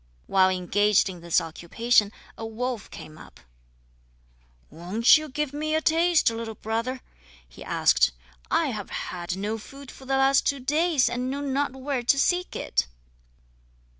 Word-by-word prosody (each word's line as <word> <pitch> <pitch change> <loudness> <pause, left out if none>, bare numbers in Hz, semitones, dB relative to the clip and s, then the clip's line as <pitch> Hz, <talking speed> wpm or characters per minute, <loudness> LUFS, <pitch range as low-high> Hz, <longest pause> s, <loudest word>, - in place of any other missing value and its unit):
While 190 -1 +4
engaged 195 +3 +2
in 180 -2 -9
this 170 -1 +2
occupation 205 +7 +1 0.2
a - - -9
wolf 230 +1 -4
came 155 0 -11
up. - - -15 1.3
"Won't 180 - +4
you 310 -1 -1
give 290 0 -3
me 310 +1 -2
a - - +3
taste, 330 -3 +3
little 225 -1 -6
brother?" 230 +5 -3 0.5
he - - -13
asked. - - +3 0.4
"I - - +1
have - - -5
had 175 0 -5
no 210 +3 -3
food 275 +4 -12
for 265 - -14
the 270 0 +1
last 270 0 +3
two 280 - 0
days, 300 +2 +2
and 250 +1 -2
know 280 +2 -3
not 280 -1 -1
where 265 -1 -3
to 245 +3 +2
seek 355 +5 0
it." 65 - -1
245 Hz, 155 wpm, -25 LUFS, 205-280 Hz, 1.3 s, While